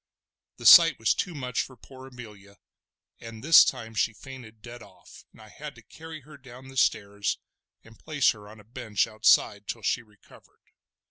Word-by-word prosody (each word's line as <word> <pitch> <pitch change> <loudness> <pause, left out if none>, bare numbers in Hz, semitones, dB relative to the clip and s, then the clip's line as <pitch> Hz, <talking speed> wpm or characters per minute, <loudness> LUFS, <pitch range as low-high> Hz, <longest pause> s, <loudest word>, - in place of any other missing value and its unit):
The - - -12
sight - - +8
was - - +1
too 180 -3 -4
much 125 -3 -3
for 130 - -10
poor 130 +3 -14
Amelia, 105 -6 -14 0.6
and 115 0 -11
this 165 +2 +8
time 115 -1 -4
she 110 +1 -1
fainted 115 -3 -13
dead 120 0 -11
off, 95 -2 -17
and - - -22
I 110 -1 -15
had 150 +5 -10
to - - -17
carry 160 -1 -12
her 150 +3 -16
down 130 0 -14
the 135 - -14
stairs, 100 -4 -1 0.5
and 115 -1 -19
place 150 -5 +1
her 105 -2 -13
on 110 +1 -15
a - - -16
bench 110 -2 -2
outside 110 -1 +1
till 115 - -6
she 115 - -1
recovered. 105 -3 -23
115 Hz, 185 wpm, -26 LUFS, 105-130 Hz, 0.6 s, sight